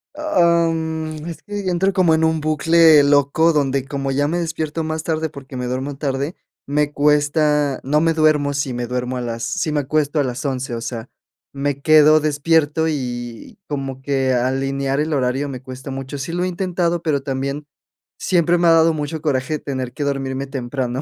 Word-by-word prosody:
Am, 165 - +1
es 170 - -8
que 205 -1 -5
yo 185 - -1
entro 190 +3 +1
como 180 -4 +3
en 160 - 0
un 160 -1 +1
bucle 155 0 +5
loco 145 +3 +3
donde, 140 -3 0
como 135 -1 -3
ya 145 +2 +1
me 170 +3 -1
despierto 160 -1 -3
más 160 0 -3
tarde, 160 -1 -1
porque 140 -2 -11
me 125 -1 -3
duermo 130 +3 -3
tarde, 140 +3 -2 0.3
me 145 +1 0
cuesta 150 -1 +2
no 150 +3 +2
me 165 0 +2
duermo 155 -2 +2
si 140 -2 -2
me 120 0 -3
duermo 125 +1 -3
a - - -3
las 115 -1 -4
si 175 -4 -1
me 150 -1 +1
acuesto 150 +2 0
a - - +3
las 125 -2 -4
11 130 -1 -2
o 115 - -4
sea, 115 -1 -6 0.4
me 140 0 -2
quedo 155 0 +6
despierto, 155 +1 +1
y 120 - -5
como 135 -2 -4
que 135 -1 0
alinear 135 +2 0
el 155 +1 -1
horario 135 +1 0
me 130 -2 -7
cuesta 130 +1 -9
mucho. 135 +1 -6
Sí 135 +5 -4
lo 175 +1 -1
he - - 0
intentado, 175 -2 -1
pero 150 -4 0
también, 140 +2 -3 0.5
siempre 175 -1 +2
me 175 0 +2
ha - - +7
dado 165 0 +5
mucho 155 +1 -4
coraje 150 0 -1
tener 130 -4 -4
que 145 - -4
dormirme 135 -1 -2
temprano. 130 -1 -3
145 Hz, 190 wpm, -20 LUFS, 135-160 Hz, 0.5 s, ha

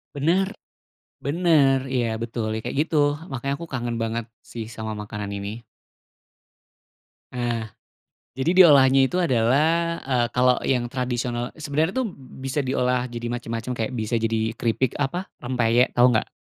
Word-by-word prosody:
Benar, 175 +7 +2 0.8
benar, 140 -4 +3
ya 120 -4 0
betul, 115 -1 -3
ya 110 - -2
kayak 120 +3 -4
gitu. 165 - -4 0.4
Makanya 135 +2 -2
aku 170 - -7
kangen 120 -2 -2
banget 115 0 -2 0.3
sih 115 -2 -5
sama 110 -1 -5
makanan 105 -1 -5
ini. 100 +4 -6 1.7
Eh. 120 -2 -1 0.8
Jadi, 175 +7 +6
diolahnya 135 -4 +6
itu 180 +7 0
adalah, 160 +4 +2
eee, 125 -3 0
kalau 125 0 +4
yang 125 -2 +1
tradisional 120 -1 -2
sebenarnya 155 +3 0
tuh 255 - 0
b 135 -10 -13
bisa 140 +2 -1
diolah 125 -1 +1
jadi 120 0 -5
macam-macam, 120 0 -4
kayak 115 +1 -2
bisa 115 -2 -2
jadi 110 0 0
keripik, 115 +2 0
apa, 160 +7 -2 0.2
rempeyek. 120 -1 +2
Tahu 120 +1 +5
nggak? - - 0
125 Hz, 140 wpm, -24 LUFS, 115-140 Hz, 1.7 s, Jadi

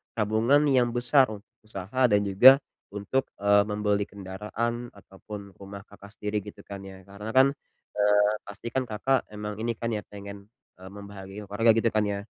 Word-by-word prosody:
tabungan 115 +7 +2
yang 120 -2 +2
besar 125 +2 +4
u 105 -2 -8 0.2
usaha, 105 +6 0
dan 105 -2 +2
juga 130 +8 +7 0.3
untuk, 115 +6 -1 0.2
eee, 100 0 +5
membeli 105 -1 0
kendaraan 105 +5 -4
ataupun 100 +1 -11
rumah 100 0 -9
Kakak 100 0 -16
sendiri 105 +1 -2
gitu 105 - -11
kan 100 -1 -8
ya. 95 0 -12
Karena 100 +4 -8
kan, 135 +1 +6 0.4
eee, 105 0 +3 0.2
pasti 105 +3 -8
kan 130 -1 -1
Kakak 120 +5 0
emang 105 0 -6
ini 115 +1 -2
kan 115 +1 -3
ya 110 - -1
pengen, 100 0 -10 0.3
eee, 95 - -11
membahagiakan 100 0 -10
keluarga 110 +3 +3
gitu 115 0 +2
kan 105 -1 +1
ya. 100 -1 -2
105 Hz, 170 wpm, -26 LUFS, 100-115 Hz, 0.4 s, juga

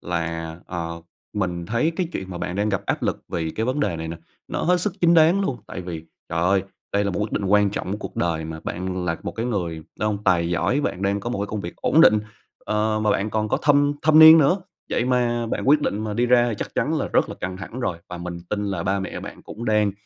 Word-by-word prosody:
là, 85 -1 -3
ờ, 85 -1 -5 0.3
mình 90 -4 -2
thấy 120 - +1
cái 180 - 0
chuyện 95 0 -5
mà 90 - -5
bạn 90 +2 -4
đang 105 +1 +1
gặp 100 -2 -1
áp - - -1
lực - - -2
vì 80 -2 -2
cái 110 +7 -2
vấn 135 +3 0
đề 95 -11 0
này 80 0 -5
nè, 85 - -5 0.3
nó - - -3
hết 180 +1 +3
sức - - 0
chính 170 0 +5
đáng 165 +4 +5
luôn. 135 -10 -1
Tại - - -6
vì, 85 -3 -6 0.2
trời 80 - -2
ơi! 95 +1 +3 0.3
Đây 100 0 +2
là 100 - 0
một 90 - -3
quyết 105 +1 -2
định 100 - -1
quan 105 +1 +4
trọng 95 -1 -4
của 105 - -3
cuộc - - -8
đời 80 -2 0
mà. 80 0 -6
Bạn 90 0 -3
là 85 -1 -1
một - - -4
cái 115 +2 -3
người 90 -8 -2 0.2
đàn 105 - +1
ông 105 0 -3
tài 85 -3 +3
giỏi, 125 - +1
bạn 95 -8 -2
đang 100 +1 +1
có 120 +4 -4
một 120 - -2
cái 100 - -1
công 105 -1 -4
việc 85 - -7
ổn - - +3
định, 105 0 +7 0.5
ờ, 110 0 0
mà 105 - +2
bạn 105 +2 0
còn 110 0 -1
có - - +1
thâm 145 0 +4
thâm 155 0 +5
niên 160 +1 +11
nữa. 170 +6 +3 0.3
Vậy 120 - +1
mà 120 -2 +1
bạn 130 - -2
quyết 150 +1 +6
định 110 -5 -1
mà 105 -1 -3
đi 120 +2 +2
ra 120 -2 +4
chắc - - -5
chắn - - 0
là - - -2
rất - - +2
là - - -6
căng 90 0 -5
thẳng 110 +7 -7
rồi. 90 -8 -2
Và 90 -1 -6
mình 85 0 -6
tin 105 -1 -1
là 95 -4 -2
ba 100 +2 0
mẹ 95 - -5
bạn - - -9
cũng 115 +3 -8
đang 105 -2 +2
105 Hz, 270 wpm, -23 LUFS, 90-120 Hz, 0.5 s, niên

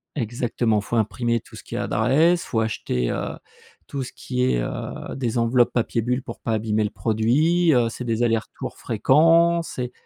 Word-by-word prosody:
exactement, 120 -3 0
faut 120 - -2
imprimer 115 +2 0
tout - - -16
ce - - -10
qui - - -8
est - - -1
adresse, 170 +5 +2
il - - -11
faut 110 - 0
acheter, 65 - -1
heu, - - -4 0.5
tout 140 -2 -4
ce 125 - -8
qui 125 -1 -3
est, 95 - +2
heu, - - -5
des 120 -3 -2
enveloppes 120 +1 +3
papier 115 -1 0
bulle 125 +3 -1
pour 120 -2 -9
pas 115 - -2
abîmer 110 0 0
le 105 - -1
produit, 120 - +2
heu, 120 -2 +3
c'est 125 - -7
des 115 0 0
allers-retours 115 -2 -2
fréquents, 165 +9 +4
c'est 125 -6 -5
120 Hz, 190 wpm, -23 LUFS, 110-135 Hz, 0.5 s, fréquents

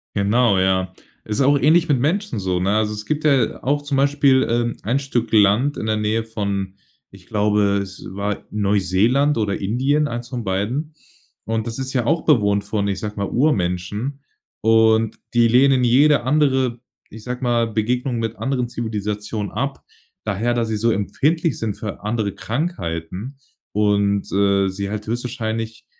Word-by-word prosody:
Genau, 105 0 +3
ja. 95 0 +1 0.3
Ist 110 +3 -3
auch 140 +2 +4
ähnlich 160 +5 +4
mit 140 -5 +2
Menschen 165 - -1
so, 95 -2 -1
ne? 95 +3 +1
Also, 110 0 +1
es 105 0 -6
gibt 155 0 -2
ja 140 -6 +2
auch 145 +2 +1
zum 145 -1 -3
Beispiel, 140 -1 +3
ähm, 120 0 0
ein 125 +7 +1
Stück 120 -5 -2
Land 110 +7 +3
in - - -4
der 110 0 0
Nähe 105 +1 0
von 100 -3 -3 0.4
ich 95 -2 -16
glaube, 105 -1 +2
es 95 0 -10
war 100 +1 -3
Neuseeland 105 +8 +2
oder 105 -2 -1
Indien- 135 +9 +1
eins 120 -1 -5
von 125 -3 -4
beiden- 115 +12 -2 0.5
und 110 0 -2
das 115 - -4
ist 130 0 -3
ja 125 -4 0
auch 160 +5 +1
bewohnt, 100 -8 +3
von 100 -2 -2
ich 100 -1 -2
sage 105 -1 -5
mal 100 -1 -1
Urmenschen. 105 - -1 0.4
Und 110 0 +3 0.2
die 120 -1 +5
lehnen 130 +1 +4
jede 140 +3 +4
andere 130 -3 +1 0.3
ich 110 0 -11
sage 125 +2 -5
mal: 120 -2 +2
„Begegnung" 120 +3 -1
mit 115 -1 -3
anderen 130 -3 -1
Zivilisationen 105 -2 -4
ab, 135 +1 -3 0.4
daher 115 +4 -1
da 120 -1 0
sie 110 -1 -2
so 115 +2 +2
empfindlich 145 - 0
sind 110 -3 -2
für 105 -2 -6
andere 105 -2 -1
Krankheiten 110 - -4 0.4
und, 100 -1 +1
äh, 100 0 +2
sie 100 +1 -4
halt 105 0 -5
höchstwahrscheinlich 115 -1 -4
115 Hz, 165 wpm, -21 LUFS, 100-130 Hz, 0.5 s, die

